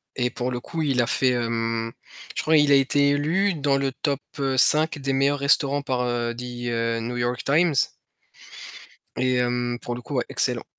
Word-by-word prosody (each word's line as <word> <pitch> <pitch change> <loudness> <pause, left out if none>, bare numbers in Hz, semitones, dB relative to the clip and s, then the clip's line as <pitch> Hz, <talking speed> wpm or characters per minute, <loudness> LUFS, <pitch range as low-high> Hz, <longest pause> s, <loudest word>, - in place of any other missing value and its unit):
et 125 -1 0
pour 125 +1 -4
le 125 - -3
coup 165 +6 -5
il 135 -4 +1
a 120 - 0
fait 130 +1 +2
hem, 115 -1 -2 0.4
je - - -1
crois 155 0 +4
il 145 -1 +4
a - - +7
été 140 +1 +3
élu 170 +7 +1
dans 140 -2 +1
le 135 -1 -1
top 140 +1 -2 0.2
heu, 135 -1 -1
5 155 +3 +4
des 135 0 -2
meilleurs 140 +1 +1
restaurants 140 0 +2
par, 130 -3 -2
heu, 120 -1 -2
The 120 -1 -3
New 120 +2 -4
York 120 +1 -2
Times 160 +4 +2 1.4
et 130 0 +1
hem, 120 0 -1
pour 120 - -5
le 125 - -8
coup, - - -7
ouais, - - 0
excellent. - - 0
130 Hz, 195 wpm, -24 LUFS, 120-145 Hz, 1.4 s, a